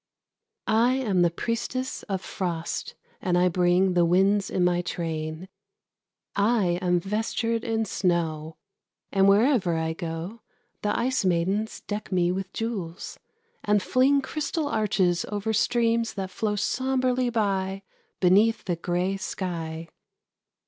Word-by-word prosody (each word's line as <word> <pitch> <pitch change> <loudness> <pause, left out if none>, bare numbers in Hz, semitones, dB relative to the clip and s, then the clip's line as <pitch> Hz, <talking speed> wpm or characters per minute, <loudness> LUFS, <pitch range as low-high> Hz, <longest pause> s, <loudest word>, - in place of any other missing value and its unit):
I 230 +3 +3
am 210 -9 +1
the 175 - +5
priestess 235 +7 -3
of 190 -2 -1
frost, 175 -3 -4 0.3
and 180 -1 +1
I 180 +1 +4
bring 180 +1 +3
The 175 -1 +4
winds 195 +3 +3
in 185 - 0
my 175 0 +2
train. 160 0 -4 0.9
I 200 -4 +2
am 180 -1 +2
vestured 225 +4 -1
in 225 -2 0
snow, 165 -5 -1 0.5
And 195 0 +4
wherever 205 - +3
I 160 0 -1
go 170 +6 -6 0.4
The 210 - 0
ice 255 0 +1
maidens 190 +5 0
deck 205 0 -5
me 175 -1 +2
with 190 +1 -4
jewels, 200 -7 -5 0.4
and 210 0 +3
fling 275 +2 +3
Crystal 305 +2 -2
arches 200 -7 +1
o'er 210 +2 -1
streams 230 0 +1
that 190 -2 -4
flow 210 0 -1
sombrely 255 +3 0
by 195 -4 -1 0.4
Beneath 205 +5 +4
the 175 -3 -1
grey 180 +3 -1
sky. 165 -4 -4
195 Hz, 130 wpm, -26 LUFS, 175-225 Hz, 0.9 s, the